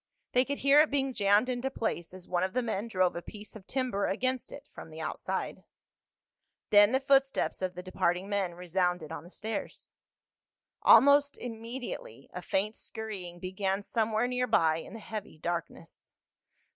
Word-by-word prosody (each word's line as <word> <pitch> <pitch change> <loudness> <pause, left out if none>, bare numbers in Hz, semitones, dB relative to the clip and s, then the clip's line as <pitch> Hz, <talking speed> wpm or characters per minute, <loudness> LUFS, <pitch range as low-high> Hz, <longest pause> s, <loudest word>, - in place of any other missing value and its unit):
They 250 +1 +4
could 280 +1 -3
hear 280 +1 +5
it 305 - +5
being 270 -2 0
jammed 205 +1 +3
into 255 +1 -1
place 175 -9 -3
as 185 -1 -11
one 175 -1 0
of 190 0 -1
the 255 - 0
men 220 -1 -2
drove 185 -5 +1
a 170 - -4
piece 210 +4 -11
of 200 -3 -12
timber 255 -7 -1
against 255 +5 -1
it - - -10
from - - -10
the - - -10
outside. - - -4 1.1
Then 205 +1 +7
the 260 - +3
footsteps 270 -4 +2
of 185 -1 -2
the 180 - -7
departing 185 0 0
men 195 -4 -1
resounded 180 -2 -1
on - - -6
the 175 - -13
stairs. 220 +4 -6 0.9
Almost 280 +4 +6
immediately 230 - -7
a 180 - -5
faint 200 +5 -1
scurrying 200 -6 -7
began 190 +2 -2
somewhere 220 +1 0
near 250 0 0
by 160 -6 +3
in 165 - -9
the 225 - -7
heavy 210 -5 -7
darkness. 170 0 -6
210 Hz, 170 wpm, -30 LUFS, 180-250 Hz, 1.1 s, Then